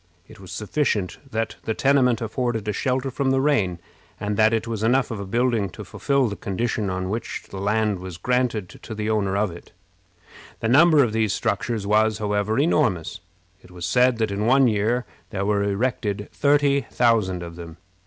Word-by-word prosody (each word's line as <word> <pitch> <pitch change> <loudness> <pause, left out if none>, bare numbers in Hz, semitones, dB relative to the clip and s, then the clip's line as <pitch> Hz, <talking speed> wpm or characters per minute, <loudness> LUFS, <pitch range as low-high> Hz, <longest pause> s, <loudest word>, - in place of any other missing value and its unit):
It - - -15
was 95 -2 -11
sufficient 105 -4 -1
that 115 -2 -3
the 110 - -1
tenement 130 -4 +3
afforded 115 -1 -2
a 105 - 0
shelter 130 +3 -1
from 135 +1 -1
the 135 0 +2
rain, 120 -12 +1 0.4
and 105 0 -2
that 110 +1 +4
it 115 0 0
was 115 -2 -3
enough 125 +3 +2
of 110 - -4
a 100 - -6
building 115 -2 +1
to - - -6
fulfill 140 -3 0
the 100 - -4
condition 105 +1 -2
on 95 0 -3
which 115 +1 -4
the 95 - -6
land 105 0 0
was 90 -2 -8
granted 120 -1 0
to 110 - -9
the 105 +1 -2
owner 100 -3 0
of 105 -2 +1
it. 85 - -13 0.9
The 115 - -1
number 155 +2 +6
of 115 -4 -1
these 110 -2 +1
structures 115 -4 -1
was, 110 +1 +2
however, 105 0 -1
enormous. 120 - +1 0.4
It - - -18
was 90 -1 -7
said 125 +5 +3
that 110 -2 0
in 105 +2 -1
one 135 +1 +5
year 115 +3 +1 0.2
there 100 -2 -3
were 105 0 +1
erected 100 0 -1
thirty 140 -1 +3
thousand 105 -7 +1
of 85 -1 -8
them. 85 -1 -10
110 Hz, 190 wpm, -23 LUFS, 100-125 Hz, 0.9 s, number